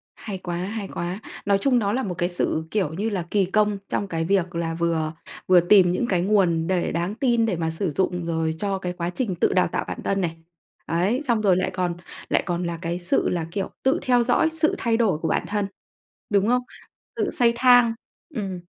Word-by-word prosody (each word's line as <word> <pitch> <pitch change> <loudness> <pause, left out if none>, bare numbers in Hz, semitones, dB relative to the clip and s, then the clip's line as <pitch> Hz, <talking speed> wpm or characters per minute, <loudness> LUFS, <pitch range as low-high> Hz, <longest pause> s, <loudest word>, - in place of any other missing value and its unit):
Hay 200 -3 -6
quá, 175 -2 -4
hay 200 +3 -4
quá! 175 +2 -4 0.3
Nói 200 -1 +3
chung 255 0 +3
đó 205 -2 0
là 260 +2 0
một 185 -4 -3
cái 175 -1 0
sự, 170 -2 -1
kiểu 190 -8 0
như 205 +7 -1
là, 185 -5 -3
kỳ 200 -2 +3
công 210 +2 +1
trong 200 - -2
cái 165 -3 -2
việc 185 -1 +1
là 165 -1 -1
vừa 165 -1 -1 0.3
vừa 185 -1 +7
tìm 180 0 +5
những 185 +7 0
cái 180 -3 +2
nguồn 180 -4 +2
để 185 -2 0
đáng 175 +5 -2
tin 235 -2 +2
để 210 -5 0
mà 160 -1 -1
sử 165 +1 -2
dụng 180 +1 -1
rồi 160 -1 -1
cho 195 +2 -1
cái 180 -1 -3
quá 175 -1 -3
trình 190 +1 -2
tự - - +1
đào - - +3
tạo - - -3
bản - - -5
thân 195 0 0
này. 165 -2 -2 0.5
Ấy, 190 - 0
xong 235 -3 +2
rồi 190 -4 +4
lại 185 0 0
còn 180 -2 -1 0.3
lại - - +2
còn 175 -1 -2
là 170 -1 -3
cái 170 0 -2
sự 175 0 +1
là, 170 -2 -1
kiểu, 195 +1 -3
tự 270 +6 +2
theo 245 -1 +3
dõi 250 +6 +3
sự 315 -1 +1
thay 230 -1 +1
đổi 220 -9 +2
của 160 - -2
bản - - +1
thân, 205 -1 -1 0.6
đúng 200 -1 +2
không? 250 +1 +3 0.5
Tự - - -1
xây 235 -1 +3
thang. 245 -1 +5 0.4
Ừm. 195 -5 -3
185 Hz, 225 wpm, -24 LUFS, 170-215 Hz, 0.6 s, vừa